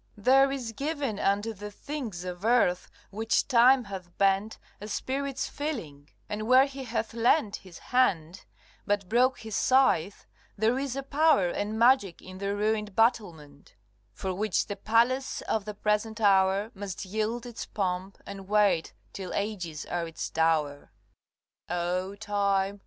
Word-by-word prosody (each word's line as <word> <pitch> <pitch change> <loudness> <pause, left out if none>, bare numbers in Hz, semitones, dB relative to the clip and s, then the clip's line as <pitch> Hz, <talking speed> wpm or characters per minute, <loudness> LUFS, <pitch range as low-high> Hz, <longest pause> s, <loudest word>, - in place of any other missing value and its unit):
There 270 +6 +4
is 255 -4 -4
given 275 -3 -3
Unto 205 +3 0
the 210 0 -8
things 225 - -6
of 180 +1 -6
earth, 225 -6 +2 0.2
which 220 +2 0
Time 250 +2 +5
hath 185 -4 -9
bent, 195 +2 +1 0.2
A 210 - -6
spirit's 270 +5 -3
feeling, 165 - -6 0.2
and 215 +1 -4
where 255 +2 +6
he 275 -1 -7
hath 230 -1 -3
leant 230 -1 +2
His 185 -3 -14 0.2
hand, 185 -8 +1 0.4
but 205 -2 0
broke 250 +5 +2
his 220 -2 -6
scythe, 230 -9 +2 0.3
there 225 +5 +2
is 275 -2 -3
a 275 - -3
power 280 - +3
And 210 +5 -3
magic 230 -6 +3
in 185 0 -11
the 200 0 -2
ruined 210 -1 -1
battlement, 170 - -1 0.4
For 190 -1 -4
which 205 +1 0
the 205 - -5
palace 235 +6 +1
of 215 -3 -2
the 210 -1 -6
present 210 +2 -1
hour 195 +1 +3
Must 195 -1 -6
yield 220 +5 -2
its 240 -2 -7
pomp, 190 -1 -3
and 195 -1 -9
wait 200 -5 +2 0.2
till 190 -2 -6
ages 180 -7 -3
are 175 -1 -3
its 165 - -6
dower. 155 -3 0 0.8
CXXX. 175 - -1
O 180 +3 -2
Time! 200 -1 0
210 Hz, 150 wpm, -28 LUFS, 190-240 Hz, 0.8 s, where